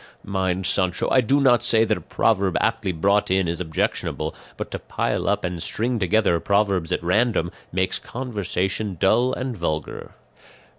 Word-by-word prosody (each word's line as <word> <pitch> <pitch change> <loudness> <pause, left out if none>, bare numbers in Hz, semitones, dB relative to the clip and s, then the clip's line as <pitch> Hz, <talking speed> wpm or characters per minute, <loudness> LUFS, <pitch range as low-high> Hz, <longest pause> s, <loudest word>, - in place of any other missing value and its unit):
Mind, 95 -1 -1
Sancho, 90 0 +1
I 130 - +5
do 135 +5 +2
not 130 -4 +4
say 115 0 +3
that 110 0 +1
a - - -7
proverb 100 -5 +1
aptly 110 -3 0
brought 100 +5 +1
in 95 -1 +2
is 85 +1 -2
objectionable; 80 -3 -2 0.2
but - - -5
to - - -4
pile - - -2
up - - 0
and 90 -1 -4
string 115 +7 -1
together 95 -2 +2
proverbs 100 -3 +1
at - - -1
random 90 -1 +1 0.2
makes 95 +1 0
conversation 100 -5 -3
dull 120 +6 +3
and 130 -1 -3
vulgar. 80 -4 -4
100 Hz, 160 wpm, -23 LUFS, 90-110 Hz, 0.2 s, I